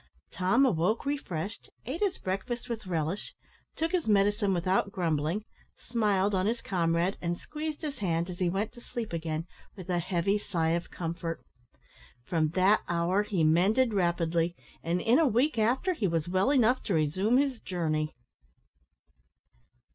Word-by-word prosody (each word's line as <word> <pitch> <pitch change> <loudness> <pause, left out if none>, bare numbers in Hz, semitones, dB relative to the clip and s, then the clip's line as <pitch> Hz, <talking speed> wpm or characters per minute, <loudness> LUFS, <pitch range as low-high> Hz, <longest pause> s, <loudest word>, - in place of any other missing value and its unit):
Tom 190 +10 +3
awoke 215 - +1
refreshed, 215 - -4 0.2
ate 270 +8 -4
his 400 -3 0
breakfast 195 +7 -3
with 225 -5 -5
relish, 165 +2 -2 0.4
took 325 +1 -1
his 355 -9 0
medicine 205 0 +3
without 185 +2 +1
grumbling, 165 +2 -1 0.3
smiled 210 -4 +1
on 190 +1 +1
his 230 +2 0
comrade, 170 -1 0
and 175 0 -1
squeezed 305 - -5
his 295 -2 -4
hand 170 -4 0
as 180 -1 -7
he 180 -2 +2
went 200 +5 -1
to 240 - -13
sleep 235 -5 -5
again 160 -1 -2 0.3
with 185 -2 -6
a 175 - +2
heavy 185 +4 0
sigh 170 -6 -1
of 170 +1 -1
comfort. 165 -1 -4 0.8
From 160 -3 +1
that 190 +3 +4
hour 175 +3 +2
he 200 -5 0
mended 200 +10 +3
rapidly, 170 -2 +1 0.3
and 170 +2 0
in 235 - +4
a 320 - +4
week 245 +2 +2
after 255 - +2
he 220 - 0
was 165 -2 -1
well 185 +7 +2
enough 255 -2 +3
to 195 - 0
resume 185 +10 +2
his 270 -3 +1
journey. 155 -4 -1
190 Hz, 155 wpm, -29 LUFS, 170-230 Hz, 0.8 s, that